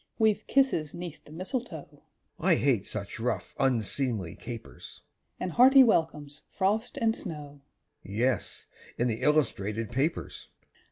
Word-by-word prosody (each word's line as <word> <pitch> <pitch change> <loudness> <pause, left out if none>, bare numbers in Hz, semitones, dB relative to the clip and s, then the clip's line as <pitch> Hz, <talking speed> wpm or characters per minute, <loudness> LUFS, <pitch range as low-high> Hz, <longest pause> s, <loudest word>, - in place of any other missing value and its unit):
_) - - -35
We've 215 -2 +2
kisses 250 - +2
'neath 170 -3 -8
the - - -15
mistletoe 165 - -5 0.4
(I 175 0 +4
hate 125 -10 +1
such 105 +1 -5
rough, 120 +2 -2
unseemly 120 -6 0
capers!) 115 -2 -9 0.4
And 185 - -2
hearty 265 - +8
welcomes, 155 - +1
frost 205 +3 0
and 225 -1 +2
snow; 145 -5 -7 0.4
(_Yes, 115 +6 -1 0.3
in 120 - +1
the 115 0 -2
illustrated 115 -7 +1
papers. 140 +7 -2
150 Hz, 125 wpm, -29 LUFS, 120-190 Hz, 0.4 s, hearty